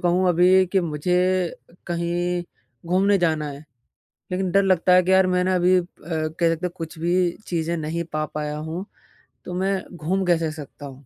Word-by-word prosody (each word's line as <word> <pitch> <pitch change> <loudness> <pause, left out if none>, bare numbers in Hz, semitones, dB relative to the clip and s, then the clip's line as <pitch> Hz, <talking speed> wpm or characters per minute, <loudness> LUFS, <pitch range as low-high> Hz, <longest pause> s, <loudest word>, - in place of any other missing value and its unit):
कहूँ 180 +1 +2
अभी 180 +2 +5
कि 195 - +4
मुझे 170 +1 -1 0.5
अ, - - -21
कहीं 175 +1 -1 0.4
घूमने 195 +3 +3
जाना 155 -3 0
है 140 +2 -10 0.7
लेकिन 185 0 -1
डर 200 +2 +4
लगता 185 -1 +3
है 185 - +6
कि 185 - 0
यार 190 0 +5
मैंने 180 0 +1
अभी 180 +1 +4
अ, - - -3 0.2
कह 160 +1 0
सकते 165 +2 -1
हैं - - -6
कुछ 165 -2 -7
भी 175 +1 +2 0.2
चीज़ें 170 -1 -1
नहीं 160 +2 -3
पा 155 0 0
पाया 150 0 -3
हूँ। 160 +5 -5 0.6
तो 180 - -6
मैं 190 +1 0
घूम 180 +4 -1
कैसे 165 -3 +1
सकता 150 -1 -10
हूँ, 135 0 -11
175 Hz, 185 wpm, -23 LUFS, 160-185 Hz, 0.7 s, है